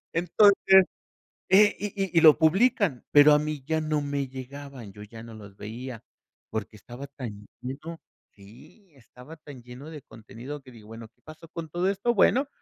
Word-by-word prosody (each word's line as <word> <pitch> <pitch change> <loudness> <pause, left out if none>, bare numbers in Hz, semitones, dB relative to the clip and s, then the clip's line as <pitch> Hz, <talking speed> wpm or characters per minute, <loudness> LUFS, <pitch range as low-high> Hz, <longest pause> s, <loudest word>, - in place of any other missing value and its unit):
Entonces, 190 +2 +4 0.6
eh, 205 +2 +5
y 205 -1 -5
y 190 - -6
y 165 - +7
lo 155 -2 +7
publican, 190 - +2
pero 145 +1 +7
a 150 - +5
mí 150 -3 -5
ya 160 0 0
no 155 -1 -1
me 140 -2 -3
llegaban, 130 -4 -10
yo 105 - -12
ya 110 +2 -11
no 115 -1 -11
los 100 -2 -13
veía 115 +2 -8 0.5
porque 110 0 -5
estaba 120 +7 -10
tan 105 -5 -8 0.2
lleno 150 +6 -7 0.4
Sí, 115 - -18
estaba 125 +5 -15
tan 145 -5 -13
lleno 125 +6 -11
de 150 -4 -10
contenido 120 +6 -10
que 130 -2 -16
digo, 110 -3 -16
bueno, 115 0 -10
¿qué 115 - -44
pasó 155 +1 -13
con 165 0 -7
todo 175 +4 -1
esto? 200 +5 0
Bueno, 265 +7 +3
145 Hz, 180 wpm, -26 LUFS, 120-165 Hz, 0.6 s, y